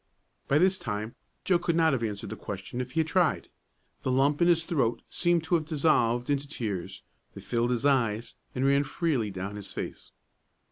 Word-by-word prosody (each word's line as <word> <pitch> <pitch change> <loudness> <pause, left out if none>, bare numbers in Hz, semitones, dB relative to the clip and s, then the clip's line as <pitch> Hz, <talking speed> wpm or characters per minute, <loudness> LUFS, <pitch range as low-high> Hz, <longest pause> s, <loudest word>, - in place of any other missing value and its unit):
But 145 +3 +3
this 185 0 +3
time 105 +1 -4 0.3
Joe 180 -2 +3
could 170 -1 0
not 160 -2 +4
have 130 - 0
answered 105 -3 -4
the - - -4
question 100 +5 -5
if 125 0 -6
he 165 - +3
had 160 - -2
tried. 175 -1 +1 0.5
The 130 - -1
lump 140 +4 +2
in 170 - +5
his 170 -2 +3
throat 120 -9 0
seemed 175 -2 +2
to 160 - -3
have 160 -3 +3
dissolved 125 -6 +2
into 145 0 0
tears; 105 - -4 0.3
they - - -8
filled 120 0 0
his 125 +2 -1
eyes, 120 -5 +1 0.2
and 130 +1 0
ran 140 +1 +4
freely 140 -7 -1
down 95 +2 -5
his 100 -1 -7
face. - - -6
135 Hz, 195 wpm, -28 LUFS, 115-160 Hz, 0.5 s, in